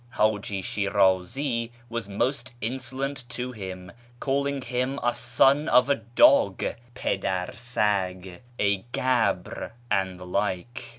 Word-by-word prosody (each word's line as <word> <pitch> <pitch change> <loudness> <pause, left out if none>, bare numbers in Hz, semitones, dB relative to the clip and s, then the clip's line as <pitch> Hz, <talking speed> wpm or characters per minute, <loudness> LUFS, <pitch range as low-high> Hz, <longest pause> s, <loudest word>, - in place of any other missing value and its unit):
Haji 105 -2 +1
Shinizi 110 +6 +1 0.2
was 115 -3 -4
most 130 +5 -1
insolent 130 +3 -3
to 125 +1 -4
him, 95 -4 -7 0.3
calling 140 0 0
him 125 +3 -1
a 120 0 +2
son 135 +5 +3
of 125 +2 +5
a 140 - +5
dog 115 -2 +4 0.2
(" 120 0 -27
jndar 90 -6 -1
sag 95 -6 -1
"), 120 - -28
a 100 -1 +3 0.2
gab?', 115 -10 0 0.2
and 95 -2 0
the 90 - -9
like. 100 +4 -2
115 Hz, 125 wpm, -26 LUFS, 95-130 Hz, 0.3 s, of